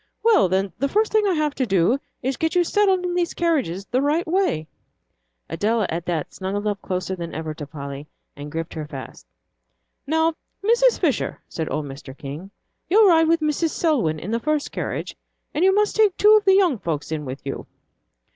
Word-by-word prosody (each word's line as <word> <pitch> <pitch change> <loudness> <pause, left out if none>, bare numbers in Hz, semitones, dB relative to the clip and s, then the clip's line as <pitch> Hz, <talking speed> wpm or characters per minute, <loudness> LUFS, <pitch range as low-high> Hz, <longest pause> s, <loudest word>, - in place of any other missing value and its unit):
Well 440 - +5
then, 190 0 0
the 275 - +1
first 430 +5 +1
thing 430 -1 +3
I 375 - +2
have 305 -2 0
to 260 - -1
do 195 +6 +2 0.2
is 265 +2 0
to - - -11
get 320 +2 0
you 355 - +5
settled 385 0 +2
in 355 - -1
these 350 -1 -1
carriages 265 - 0
the 250 +6 0
right 300 +4 +1
way." 340 - 0 0.8
Adela, 220 0 0
at 170 +1 -4
that, 165 -4 -2
snuggled 200 +2 -3
up 205 -1 -1
closer 185 0 -3
than 170 -2 -6
ever 160 0 -4
to 150 -1 -8
Polly, 140 0 -7 0.3
and 145 0 -8
gripped 165 +1 -4
her 155 -2 -5
fast. 130 - -9 0.8
"Now, 320 +2 +2 0.3
Mrs. 475 +3 +4
Fisher," 295 - 0
said 160 -2 -4
old 150 - -2
Mr. 135 -1 -10
King, 150 +6 -7 0.4
"you'll 415 +2 +6
ride 325 -2 +5
with 330 0 +3
Mrs. 305 +2 +1
Selwyn 245 - +1
in 175 +7 -6
the 230 - 0
first 305 +3 -1
carriage, - - -4 0.4
and 315 - 0
you 380 - +6
must 415 +1 +2
take 420 -4 +3
two 425 +1 +7
of 425 -2 +3
the 385 -1 +6
young 355 - +3
folks 160 -4 -3
in 155 -1 -2
with 135 0 -7
you." 135 - -5
245 Hz, 205 wpm, -23 LUFS, -, 0.8 s, two